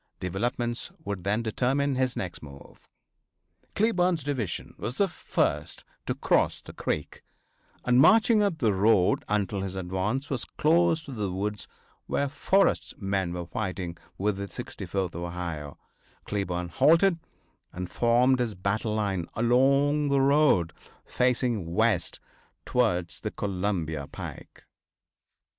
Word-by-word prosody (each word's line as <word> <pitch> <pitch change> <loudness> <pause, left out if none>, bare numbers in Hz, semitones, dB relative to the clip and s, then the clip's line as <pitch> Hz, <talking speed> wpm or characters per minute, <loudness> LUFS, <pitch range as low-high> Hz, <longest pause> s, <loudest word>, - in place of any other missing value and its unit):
Developments 120 +6 -1
would 100 -3 -4
then 105 +4 0
determine 135 +5 0
his 130 -1 0
next 90 -2 -5
move. 70 -2 -14 0.9
Cleburne's 180 -7 +2
division 130 -10 -3
was 115 +5 -4
the 200 - +3
first 170 - -1 0.2
to - - 0
cross - - +2
the - - -12
creek, 75 - -3 0.6
and 125 0 +4
marching 220 - +6
up 200 -5 +1
the 115 -8 +2
road 95 -1 +3
until 100 -1 0
his 95 -1 -4
advance 95 +9 -2
was 130 -4 -1
close 165 +1 +2
to 140 - -8
the 105 -6 -3
woods 105 +3 -3 0.4
where 140 - 0
Forrest's 190 +8 +1
men 95 -3 -1
were 90 0 -4
fighting 95 -2 -4 0.2
with 100 0 0
the 100 0 -4
64th 95 -2 -4
Ohio, 85 -4 -5 0.5
Cleburne 90 -4 -2
halted 165 - +4 0.5
and 90 0 -5
formed 120 +6 +3
his 115 -4 -1
battle 105 +4 -1
line 95 -5 -1
along 140 +5 +3
the 140 0 +3
road 135 - +3 0.3
facing 120 -8 0
west 110 -7 +1 0.5
towards 90 -9 0
the - - -3
Columbia 90 -7 -2
pike. - - -9
105 Hz, 125 wpm, -27 LUFS, 95-135 Hz, 0.9 s, marching